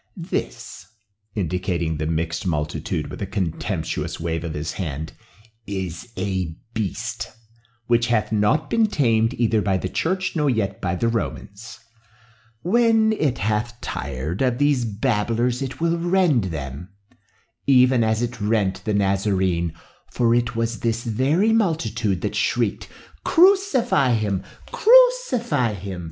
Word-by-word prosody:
This," 90 - -5 0.5
indicating 85 -4 -1
the 75 0 -2
mixed 80 +2 -2
multitude 75 -3 -2
with - - -8
a 100 - -2
contemptuous 95 -5 -3
wave 80 0 -2
of 80 -2 -4
his 75 +1 -3
hand, 80 -4 -5 0.5
"is 95 +1 -5
a 95 -4 -2 0.2
beast, 115 +3 -3 0.5
which 120 0 +2
hath 115 -3 +1
not 105 +8 +2
been 225 -1 +2
tamed 115 - +2
either 115 -2 +2
by 95 -2 +1
the 95 - -3
church 185 - -1
nor 150 -3 +2
yet 100 -5 -1
by 90 -1 -1
the 115 - 0
Romans. 110 -1 -4 0.9
When 225 +1 +3
it 150 - 0
hath 110 +3 -1
tired 70 - -4
of 125 -2 +2
these 145 -3 +2
babblers 115 +3 0
it 130 -1 -5
will 170 +1 +1
rend 175 - +2
them, 75 0 -6 0.8
even 130 -2 +5
as 110 +1 +1
it 120 -2 -4
rent 105 -2 0
the 105 -2 -1
Nazarene, 95 -4 +1 0.4
for 115 -1 +2
it 120 0 0
was 115 0 -1
this 115 0 -1
very 140 - +2
multitude 120 - 0
that 105 - -2
shrieked, 110 0 0 0.4
'Crucify 335 - +4
him! 105 -4 -1 0.3
crucify 415 - +4
him! 95 -1 -6
110 Hz, 135 wpm, -22 LUFS, 95-135 Hz, 0.9 s, even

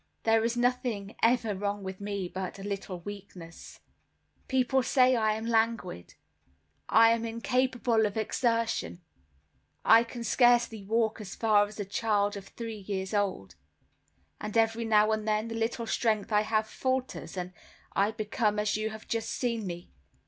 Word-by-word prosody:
There 225 0 +3
is 235 +1 0
nothing 240 -4 -1
ever 230 -2 +3
wrong 200 +1 -3
with 190 +1 -7
me, 200 -2 -3
but 185 +1 -5
a 195 - -9
little 195 -3 -5
weakness. 185 -4 -10 0.7
People 260 0 +2
say 255 0 +4
I 220 -2 +2
am 220 +1 -5
languid; 225 - -1 0.7
I 225 +1 +6
am 230 0 0
incapable 235 -1 +1
of 205 - -6
exertion; 230 -4 -1 0.8
I 225 +1 +7
can 235 0 -7
scarcely 240 -3 +3
walk 220 +1 0
as 200 - -8
far 210 -2 +3
as 210 +1 -12
a 205 - -2
child 205 0 0
of 195 -1 -8
three 225 -1 -7
years 190 0 -4
old: 195 - -1 0.9
and 210 +1 -3
every 225 +1 +2
now 215 -1 +4
and 215 0 -1
then 215 +1 0
the - - -4
little 230 +1 -2
strength 220 -2 0
I 210 0 +4
have 215 0 0
falters, 260 -2 -3
and 180 0 -4 0.4
I 200 +1 +3
become 215 0 -1
as 210 0 0
you 215 +1 -1
have 220 0 -10
just 230 -1 -2
seen 230 -5 -2
me. 175 0 -7
220 Hz, 160 wpm, -29 LUFS, 205-230 Hz, 0.9 s, I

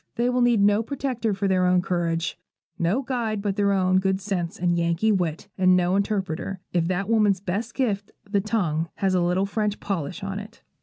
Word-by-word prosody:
They 240 +1 +1
will 250 0 +1
need 240 -3 +4
no 205 +1 +4
protector 245 -3 -2
but 200 0 -1
their 185 -1 +3
own 180 0 +3
courage, 170 -1 -1 0.4
no 190 +11 +1
guide 235 -5 -2
but 200 -1 -2
their 200 -1 +2
own 185 -1 +3
good 190 0 0
sense 185 -4 -3
and 175 -1 +1
Yankee 170 +5 +1
wit, 175 -2 -1
and 185 -1 +5
no 180 +1 +2
interpreter, 195 -2 -2
if 170 -2 +1
that 185 +2 -1
woman's 210 -4 +3
best 205 +5 -3
gift, 210 -6 -1 0.2
the 200 -1 +1
tongue, 170 -7 -1
has 190 -1 0
a 180 - +2
little 180 +3 +1
French 210 0 -1
polish 180 -3 -4
on 195 0 -3
it. 210 +2 -12
195 Hz, 200 wpm, -24 LUFS, 180-210 Hz, 0.4 s, and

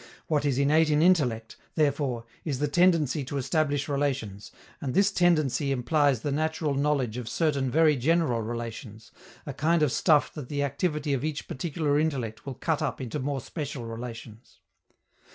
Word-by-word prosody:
What 150 -2 0
is 135 -3 +1
innate 150 +3 +3
in 150 +1 +3
intellect, 125 -11 +2 0.2
therefore, 140 -6 0 0.2
is 145 -5 -2
the 150 +3 0
tendency 165 -3 +2
to 140 +2 -4
establish 145 +1 0
relations, 135 -8 -2 0.3
and 130 -3 -3
this 200 +1 +4
tendency 155 -7 +2
implies 135 0 +2
the 145 - -2
natural 155 0 -1
knowledge 135 -5 0
of 120 -2 -5
certain 140 -2 0
very 155 +2 +4
general 135 -3 +1
relations, 115 -1 -7 0.3
a - - -5
kind 165 +1 +2
of 145 - +2
stuff 150 0 +3
that 145 -5 -8
the 145 -1 -1
activity 150 0 -1
of 135 - -1
each 155 -1 -3
particular 150 0 -1
intellect 135 -7 -2
will 135 - -4
cut 160 +2 -1
up - - -2
into 130 +2 -4
more 140 0 -2
special 140 -3 -6
relations. 115 -1 -9
145 Hz, 165 wpm, -27 LUFS, 125-155 Hz, 0.3 s, this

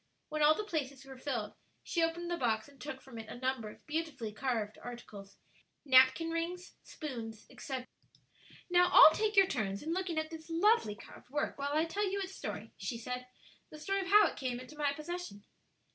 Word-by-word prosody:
When 305 0 -2
all 300 +1 +7
the 425 - -2
places 280 -8 -3
were 265 -1 -11
filled, 240 -7 -3 0.3
she 340 - -1
opened 340 +1 0
the - - +1
box 235 -6 0
and 280 -1 -18
took 270 -3 -6
from 255 -4 -10
it 220 -1 -9
a - - -7
number 255 -3 -2
of - - -15
beautifully 295 -8 -3
carved 225 -4 -2
articles 210 -5 -9 0.5
napkin 265 +5 +6
rings, 345 +2 -3
spoons, 230 -8 -7
etc. 260 -2 -5 0.8
"Now, 355 0 +5
all 315 - +10
take 430 -1 0
your 390 0 +8
turns 200 - -2
in 320 +2 -1
looking 365 -2 -2
at 315 +1 -1
this 320 0 -9
lovely 335 - +3
carved 210 - -14
work, 290 +1 -2
while 285 +1 -1
I 310 +2 +3
tell 395 +4 -1
you 400 - -1
its 380 -1 -5
story," - - -6
she 235 - -4
said, 250 +2 -5 0.4
"the 310 - -10
story 390 +6 -1
of 375 - -5
how 415 +2 +7
it - - -2
came 250 -2 -2
into 255 +4 -11
my 295 -1 +1
possession." 305 - -6
295 Hz, 200 wpm, -33 LUFS, 250-340 Hz, 0.8 s, all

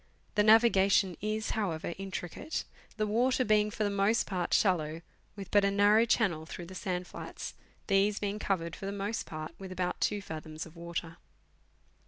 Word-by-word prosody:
The 210 - +3
navigation 205 -4 +5
is, 215 +1 -2
however, 170 -6 -2
intri 185 -2 -5
cate, 320 - -4 0.3
the 215 - +1
water 250 +4 +2
being 210 0 +3
for 215 - -2
the 205 - +1
most 200 +3 +2
part 180 -3 -2
shallow, 165 -4 +2 0.3
with 200 -2 -8
but 205 -1 +5
a 200 - +4
narrow 205 +3 +5
channel 180 -9 +1
through 175 - -7
the 185 - -10
sand 180 -1 -3
flats, - - -7 0.3
these 200 +1 +3
being 205 0 -2
covered 170 -5 -1
lor 195 - -4
the 200 - -6
most 205 +3 -3
part 155 0 -6
with 190 -1 -8
about 180 -1 -2
2 210 - +1
fathoms 155 -2 -6
of 165 0 -14
water. 170 -1 -5
195 Hz, 180 wpm, -31 LUFS, 170-210 Hz, 0.3 s, navigation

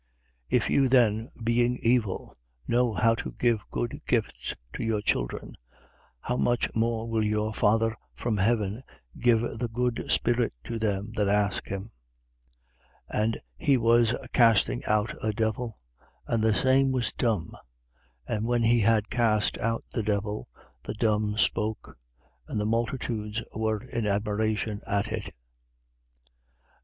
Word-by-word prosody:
11:13. - - +5
If - - -1
you 135 -2 +4
then, 115 -3 +3
being 120 +2 +2
evil, 115 -5 +1 0.3
know 120 0 +2
how 115 +2 +3
to 115 - -5
give 115 -4 +1
good - - -3
gifts - - -1 0.2
to - - -4
your 110 -2 0
children, - - -2 0.7
how 125 - -2
much 120 -1 +1
more 115 0 0
will 110 -1 0
your 105 0 0
Father 115 +2 +2 0.2
from 115 -3 -1
heaven 105 +1 +1 0.4
give 120 -2 +4 0.2
the 120 - -1
good 120 +1 -1
Spirit 120 - +2
to 115 - -4
them 105 0 -1
that 105 -2 +1
ask 100 -1 +1
him? 95 -1 -4 1.3
11:14. 105 - +2
And 115 +1 -1 0.2
he 140 -2 +3
was 115 0 +4 0.2
casting 115 - +4
out 105 +1 +1
a 110 -1 0
devil: 110 +1 -2 0.5
and 115 -2 0
the 110 -1 +3
same 135 +2 +3
was 125 -3 -1
dumb. 105 -9 0 0.7
And 110 0 -2
when 120 -1 +2
he 120 +1 +4
had 110 -1 +2
cast 110 -3 +2
out 115 +1 -1
the 115 - -1
devil, 105 0 -2 0.3
the - - -6
dumb 105 -1 +1
spoke: 110 -1 0 0.5
and 105 - -2
the 105 - 0
multitudes, 115 -1 -2
were 110 -1 -1
in 115 -2 -3
admiration 105 +1 -1
at 100 0 0
it. - - -3
11:15. - - -8
110 Hz, 145 wpm, -27 LUFS, 105-120 Hz, 1.3 s, 11:13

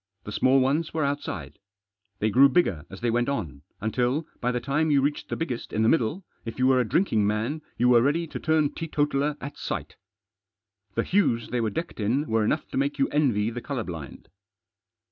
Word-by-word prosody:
The 105 - -7
small 130 +5 +4
ones 145 +6 0
were 155 -2 +1
outside. 80 - -4 0.6
They 110 +1 0
grew 135 +5 +7
bigger 100 - +1
as 95 - -10
they 120 -1 +1
went 120 +2 +1
on, 75 - -3 0.2
until, 125 +8 0
by 125 - 0
the 125 - -1
time 145 +6 0
you 145 -2 +4
reached 145 +2 -1
the - - -1
biggest 130 -8 -4
in 110 - +1
the 110 - +4
middle, 165 - +1 0.2
if 115 - -6
you 130 - +2
were 130 -1 +5
a 120 -3 0
drinking 110 - +2
man 110 +9 -1 0.2
you 125 - +3
were 120 -1 +6
ready 150 +6 +1
to 160 - -7
turn 155 -2 +2
teetotaler 150 -2 -1
at 140 +1 -7
sight - - -4 1.0
The 115 - +1
hues 150 - +1
they 120 0 0
were 110 - +1
decked 165 +8 -5
in 120 +8 +1
were 110 -4 +1
enough 150 +9 0
to - - -4
make 140 +2 0
you 135 - +2
envy 120 -8 +1
the 120 +1 -5
colour 135 -4 -3
blind. 80 - -8
130 Hz, 205 wpm, -26 LUFS, 110-150 Hz, 1.0 s, grew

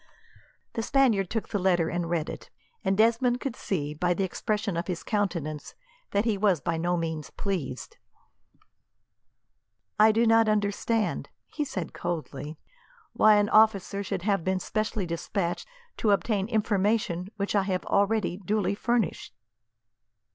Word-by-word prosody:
The 225 - -2
Spaniard 225 -7 +2
took 225 -1 -3
the 205 - -1
letter 180 -3 +2
and 170 0 -2
read 165 -2 0
it, - - -8 0.3
and 190 0 +1
Desmond 235 +3 +3
could 270 -3 -4
see, 150 -6 -3
by 175 +3 0
the 195 - 0
expression 205 +1 -2
of 170 +1 -2
his 180 -3 -3
countenance, 170 -8 -2 0.3
that 200 +2 +1
he 215 -4 +1
was 195 -5 +3
by 165 +4 -1
no 175 +2 0
means 160 -2 -3
pleased. 150 - -4 2.0
"I 215 +1 +7
do 225 +2 +2
not 225 -1 +5
understand," 210 +1 0 0.2
he 300 - -2
said 185 - -5
coldly, 155 -3 -5 0.6
"why 215 0 +6
an 205 0 +3
officer 210 -2 +3
should 195 -3 -3
have 195 -4 +1
been 190 +1 0
specially 215 +1 -2
despatched 170 +1 -3 0.3
to 220 - +1
obtain 200 0 +1
information 205 -4 0
which 200 0 -2
I 200 - +4
have 190 -2 -2
already 200 -2 +1
duly 205 +1 0
furnished." 230 -2 -1
200 Hz, 145 wpm, -27 LUFS, 175-215 Hz, 2.0 s, I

